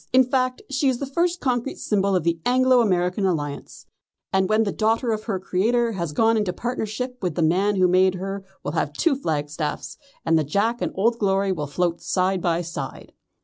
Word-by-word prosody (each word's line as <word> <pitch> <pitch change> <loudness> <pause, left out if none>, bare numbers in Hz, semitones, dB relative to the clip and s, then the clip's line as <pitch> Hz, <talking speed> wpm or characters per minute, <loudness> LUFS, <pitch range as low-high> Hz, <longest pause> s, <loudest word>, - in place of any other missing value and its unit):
In 260 +1 +6
fact 255 0 -1
she 275 0 +1
is 255 - 0
the 280 - -4
first 340 +6 0
concrete 250 -1 -1
symbol 200 -2 0
of 180 - +1
the 170 0 0
Anglo 255 0 +4
American 180 -2 +1
Alliance, 150 -6 -3 0.5
and 190 -1 +2
when 215 +1 +3
the 200 - -1
daughter 225 +3 +1
of 215 0 -3
her 205 -5 -1
creator 230 +6 +1
has 170 -7 -3
gone 225 +7 +3
into 205 -4 0
partnership 245 +4 -4
with 180 -5 -2
the 170 - +1
man 190 +6 +2
who 185 -1 +4
made 185 +1 +3
her 195 +1 -5 0.2
we'll - - -3
have 150 -2 -1
two 280 - +2
flagstaff's, 150 - -3 0.3
and 165 0 +3
the - - +1
Jack 210 - 0
and - - -1
Old 230 +4 +1
Glory 195 -1 +1
will 150 -5 -3
float 170 +3 -1
side 185 0 0
by 170 0 0
side." 160 -5 -7
195 Hz, 200 wpm, -23 LUFS, 175-240 Hz, 0.5 s, In